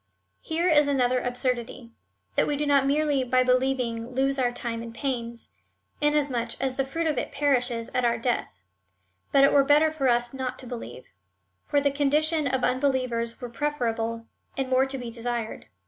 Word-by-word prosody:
Here 330 +2 -1
is 295 -4 +5
another 255 -3 +2
absurdity 245 -1 -3 0.2
— - - -44
that - - +2
we 290 - 0
do 295 - -1
not 280 -2 +3
merely 290 -1 +2
by 255 0 +2
believing 250 -2 0
lose 270 +1 +1
our 245 -2 +2
time 235 -1 -4
and 230 0 -7
pains, 235 -3 -4 0.5
in 295 0 +3
asmuch 250 -6 -1
as 265 -1 -1
the 270 0 0
fruit 330 +5 -3
of 300 -5 +1
it - - -4
perishes 250 -5 0
at 250 - +1
our 235 0 +2
death, 230 - -2 0.7
but 275 - +5
it 275 - +5
were 280 - +6
better 295 +3 +4
for 290 -4 -1
us 240 0 +1
not 260 -1 -4
to 260 - -8
believe; 235 - -8 0.6
for 290 - +2
the 280 0 +1
condition 300 +2 +2
of 260 -1 -1
unbelievers 255 -3 0
were 245 - -6
preferable, 230 -4 -2 0.3
and 265 -1 -1
more 260 +1 +3
to 270 0 -4
be 245 -2 -6
desired. 235 -1 -4
255 Hz, 185 wpm, -26 LUFS, 240-280 Hz, 0.7 s, were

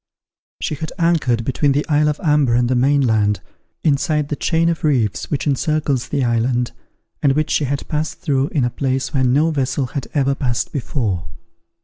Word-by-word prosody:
She - - -2
had 160 +1 -5
anchored 155 -10 +1
between 140 +2 +1
the 145 +2 -1
isle 150 -1 +3
of 150 - -2
Amber 150 -6 +3
and 120 0 +2
the 130 - +1
main 140 +3 +3
land, 105 -5 +2 0.4
inside 145 0 +1
the 150 - -1
chain 165 +2 +1
of 170 -1 -1
reefs 125 -9 0
which 145 - -2
encircles 145 -2 0
the 140 -3 0
island, 120 +1 +1 0.5
and 140 -2 +3
which 155 +2 0
she 150 - +2
had 140 +1 -3
passed 155 0 -2
through 140 -6 0
in 145 -4 0
a 120 - 0
place 135 0 -2
where 135 -2 +2
no 145 +6 +3
vessel 135 -2 0
had 140 - -3
ever 140 -1 +2
passed 125 -4 -2
before. 115 - -2
140 Hz, 190 wpm, -19 LUFS, 125-150 Hz, 0.5 s, isle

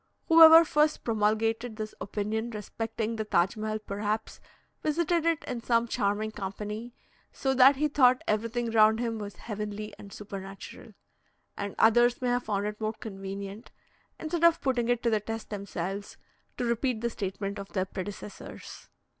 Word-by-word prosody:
Whoever 325 0 +10
first 300 0 +2
promulgated 225 +1 0
this 215 0 -5
opinion 215 +3 -2
respecting 225 +1 -4
the 220 - -1
Taj 190 -2 +1
Mehal 215 0 -2
perhaps 210 +2 -3 0.4
visited 335 +2 +1
it 330 -2 +1
in 245 -2 -5
some 230 0 +2
charming 210 0 -1
company, 210 +4 -6 0.4
so 265 -1 -1
that 265 +2 +7
he 300 +3 +1
thought 255 -3 +4
everything 230 +2 -1
round 220 0 +5
him 230 -2 -2
was 205 -2 -7
heavenly 210 +1 -6
and 200 - -11
supernatural; 195 +2 -9 0.6
and 200 -1 -5
others 240 +2 +4
may 250 - -1
have 245 0 0
found 205 -1 -1
it 210 +1 -5
more 215 0 -1
convenient, 195 0 -7 0.5
instead 330 +1 -3
of 335 0 +6
putting 245 -3 0
it 245 -1 +1
to 235 - +2
the 215 - +2
test 225 +1 -6
themselves, 200 -1 -5 0.4
to 245 - -1
repeat 235 0 0
the 235 - 0
statement 200 0 -4
of 200 0 -8
their 185 -2 0
predecessors. 200 +2 -8
220 Hz, 155 wpm, -28 LUFS, 205-245 Hz, 0.6 s, Whoever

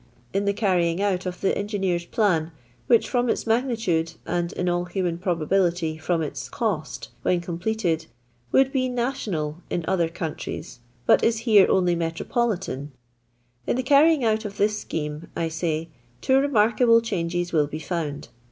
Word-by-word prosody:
In 200 +1 0
the 200 - +3
carrying 180 -5 +1
out 190 -2 0
of 180 0 -5
the 195 - +2
engineer's 195 -4 -1
plan 170 -6 +1 0.2
— 120 0 -34
which 235 - +4
from 245 -1 +1
its - - 0
magnitude, 225 -9 0
and, 175 0 -1
in 180 - -2
all 175 0 +1
human 175 -2 -2
probability, 175 -1 0
from 165 +1 0
its 135 -4 -5
cost^ 200 - -3
when 180 - +2
completed, 170 -1 -2 0.4
would 270 0 +4
be 255 -2 0
national 210 - -2
in 170 - -2
other 175 -3 +1
countries, 160 -6 -6 0.3
but - - +5
is 230 -1 +2
here 210 -5 +6
only 180 -2 +3
metropolitan 170 - -2 0.4
— 120 0 -40
in - - +1
the 255 - -1
carrying 290 +2 +5
out 220 -1 +1
of 205 -2 -7
this 210 +1 +2
scheme, 150 -1 -5
I 165 -1 -1
say, 160 0 -2 0.3
two 265 - +3
remarkable 230 -3 +4
changes 175 -5 -2
will 150 -3 +3
be 155 +2 -6
foimd. 155 -4 -4
180 Hz, 160 wpm, -24 LUFS, 165-220 Hz, 0.4 s, here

